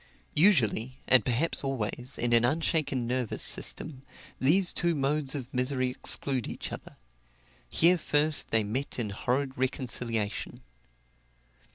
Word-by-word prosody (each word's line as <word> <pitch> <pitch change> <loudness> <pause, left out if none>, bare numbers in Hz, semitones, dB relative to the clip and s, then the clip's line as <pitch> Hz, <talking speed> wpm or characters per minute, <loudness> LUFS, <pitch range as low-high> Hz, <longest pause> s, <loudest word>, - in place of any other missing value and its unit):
Usually, 130 - +2
and 130 -4 +5
perhaps 130 +10 +3
always, 130 -1 -3
in 120 0 0
an 115 0 +4
unshaken 140 -2 0
nervous 125 -1 -2
system, 145 -4 +4 0.4
these 175 +8 +2
two 170 -1 -1
modes 140 0 -1
of 130 -2 -7
misery 130 0 -1
exclude 130 -1 +1
each - - -7
other - - -10 0.7
here 175 +2 +3
first 150 0 +1
they 110 -1 +2
met 125 +7 -4
in 110 -5 -3
horrid 130 +5 -3
reconciliation. 115 - -3
130 Hz, 125 wpm, -27 LUFS, 120-145 Hz, 0.7 s, and